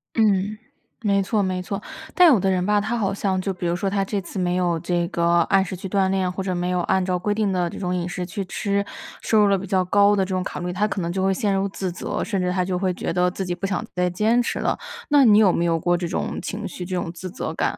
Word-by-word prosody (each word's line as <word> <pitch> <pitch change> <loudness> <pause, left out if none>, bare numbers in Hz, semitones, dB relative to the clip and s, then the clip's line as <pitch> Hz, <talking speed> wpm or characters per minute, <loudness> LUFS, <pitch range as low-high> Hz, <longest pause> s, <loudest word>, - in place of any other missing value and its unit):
嗯， 210 -2 +2 0.5
没 200 -2 +2
错， 205 +1 0
没 185 -1 -1
错。 195 +2 -4 0.3
但 360 -1 +7
有 230 - +4
的 190 - +1
人 180 -1 +1
吧， 210 0 +3
他 225 +3 -2
好 200 -3 0
像 195 -1 -1
就 195 +1 -2
比 180 -1 -4
如 170 - +1
说 195 +2 -1
他 195 0 0
这 200 +1 -2
次 190 +2 -6
没 180 -1 0
有 175 -2 +1
这 175 0 -1
个 170 -3 -1 0.2
按 195 -1 +4
时 190 0 -5
去 190 +2 -6
锻 190 0 +1
炼， 190 -1 0
或 185 - -4
者 185 -1 -2
没 175 0 -1
有 180 0 0
按 190 +2 +1
照 180 -1 -1
规 205 +3 0
定 210 -2 +1
的 180 -2 0
这 - - -8
种 180 -1 -2
饮 175 -1 -2
食 180 0 -4
去 190 +3 -4
吃， 200 +2 -1 0.4
摄 220 - +1
入 210 -1 +6
了 200 -1 +3
比 190 +1 -6
较 185 0 +2
高 205 +2 +4
的 195 - +2
这 185 - -11
种 185 -1 -1
卡 - - -5
路 180 - -4
里， 180 - -3
他 205 +3 +1
可 200 -2 -3
能 170 0 -2
就 190 +1 -1
会 195 0 +3
陷 200 +1 0
入 195 +1 +1
自 190 -1 -4
责， 170 - -3
甚 195 -5 -1
至 180 - 0
他 180 0 0
就 180 -1 -1
会 185 -2 0
觉 170 - -3
得 180 0 +2
自 190 0 -4
己 180 - -2
不 190 +2 -3
想 185 -2 -2
再 180 0 +1
坚 220 +7 +2
持 - - -2
了。 - - 0 0.3
那 290 -2 +6
你 210 -3 +7
有 210 -4 +6
没 170 - +1
有 165 -1 +1
过 175 +2 +2
这 175 0 -3
种 - - -3
情 205 +2 -4
绪， 180 - -7
这 185 +1 -3
种 175 -2 -2
自 180 +2 -7
责 210 - -5
感， - - -1
190 Hz, 320 characters per minute, -23 LUFS, 180-200 Hz, 0.5 s, 但